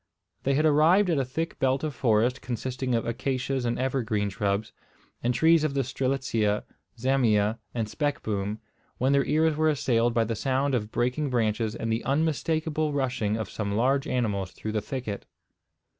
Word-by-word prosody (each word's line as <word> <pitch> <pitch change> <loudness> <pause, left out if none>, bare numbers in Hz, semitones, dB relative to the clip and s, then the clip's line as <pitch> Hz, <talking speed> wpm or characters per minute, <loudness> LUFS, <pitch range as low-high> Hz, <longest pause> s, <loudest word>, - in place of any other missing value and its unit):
They 135 0 +1
had 155 +3 +2
arrived 165 +6 +5
at 155 - +2
a - - +2
thick 160 +6 -4
belt 135 +1 +1
of 155 -2 -2
forest, 120 +1 +2
consisting 125 +1 -2
of 115 - 0
acacias 130 +2 -2
and 120 - 0
evergreen 115 -6 0
shrubs, 100 +1 -1 0.5
and 120 - +1
trees 160 +5 +4
of 145 -3 -1
the 135 - +2
strelitzia, 125 -5 0 0.3
zamia, 115 -4 +2 0.2
and 115 -2 -1
speckboom, 110 -6 -2 0.4
when 130 +2 +2
their 140 -1 +3
ears 155 +2 +2
were 155 +1 +2
assailed 120 -5 +1
by 115 - +4
the 115 +1 -2
sound 135 +4 0
of 110 -3 -1
breaking 125 +5 0
branches, 110 -2 0
and 115 -1 -3
the 115 - -2
unmistakable 155 +1 0
rushing 125 -6 0
of 110 -3 -3
some 100 +1 -3
large 135 +5 +2
animals 105 -7 -1
through 110 - -5
the 110 -1 -1
thicket. 120 -6 -5
125 Hz, 170 wpm, -27 LUFS, 110-140 Hz, 0.5 s, arrived